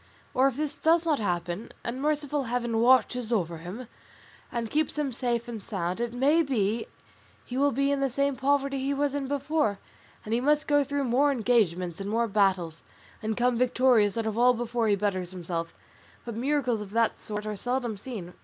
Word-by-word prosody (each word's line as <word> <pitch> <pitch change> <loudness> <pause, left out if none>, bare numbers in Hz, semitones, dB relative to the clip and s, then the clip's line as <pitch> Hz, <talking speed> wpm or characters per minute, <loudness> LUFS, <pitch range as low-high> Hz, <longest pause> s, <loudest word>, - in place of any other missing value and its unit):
Or 260 +2 +4
if 270 -2 -2
this 300 -1 -2
does 330 +1 +3
not 310 -4 +2
happen, 175 0 -2
and 245 +3 -4
merciful 295 -1 0
Heaven 235 -1 -1
watches 245 -1 +3
over 170 -7 0
him 195 +9 -7 0.6
and 235 -3 -3
keeps 305 0 0
him 285 -4 -1
safe 240 -1 -1
and 230 -3 -6
sound, 185 0 -3
it 240 -1 -1
may 280 +7 +3
be 230 -6 0 0.6
he 245 - -7
will 285 +2 +3
be 275 +2 +1
in 280 - +1
the 275 0 +1
same 280 +2 0
poverty 275 +1 +1
he 275 +1 -1
was 285 0 0
in 285 -2 -2
before, 280 -5 0 0.5
and 215 - -3
he 235 - +2
must 295 +3 +2
go 290 0 +4
through 285 +1 -2
more 270 +3 +3
engagements 200 -8 +1
and 195 - -4
more 230 +2 +1
battles, 190 -6 +1 0.4
and 220 -1 -2
come 245 -1 +2
victorious 245 -4 +3
out 225 - -1
of 220 +1 -2
all 250 +1 +5
before 235 -1 -1
he 205 - +4
betters 185 -3 -1
himself; 170 -2 -4 0.5
but 235 -2 -5
miracles 250 -2 0
of 205 - -7
that 230 -1 +1
sort 210 0 -5
are 215 0 -3
seldom 245 +1 -2
seen. 195 -5 -7
240 Hz, 195 wpm, -27 LUFS, 210-275 Hz, 0.6 s, all